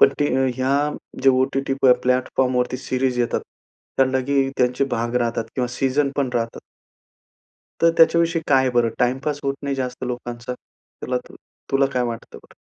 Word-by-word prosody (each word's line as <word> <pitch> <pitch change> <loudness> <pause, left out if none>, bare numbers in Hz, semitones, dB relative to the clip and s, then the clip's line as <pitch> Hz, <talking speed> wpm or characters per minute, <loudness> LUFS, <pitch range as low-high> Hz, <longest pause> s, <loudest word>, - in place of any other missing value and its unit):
पण - - +8
ती 145 - +3
अ, 130 0 +2
ह्या 130 +2 +1 0.5
जे 135 - +6
ओ-टी-टीवर 135 0 +2
प्लॅटफॉर्मवरती 125 0 +1
सिरीज 130 -1 -1
येतात 120 - 0 0.6
त्याना 130 0 +3
ही 135 -1 +2
त्यांचे 125 +2 +2
भाग 120 +1 -1
राहतात 115 -2 0
किंवा 125 -2 0
सीजन 135 +1 +1
पण 140 -2 +1
राहतात. 115 -1 -2 1.2
तर 165 - +6
त्याच्याविषयी 165 0 +4
काय 130 -2 +4
बरं 120 -2 +2
टाइमपास 135 +4 0
होत 135 - 0
नाही 140 -1 -1
जास्त 130 -1 -4
लोकांचा. 120 0 -5 0.5
तुला 125 0 -1
तर - - -14 0.4
तुला 135 0 +4
काय 125 - +1
वाटतं 115 -1 -6
बरं? - - -20
130 Hz, 155 wpm, -22 LUFS, 125-135 Hz, 1.2 s, पण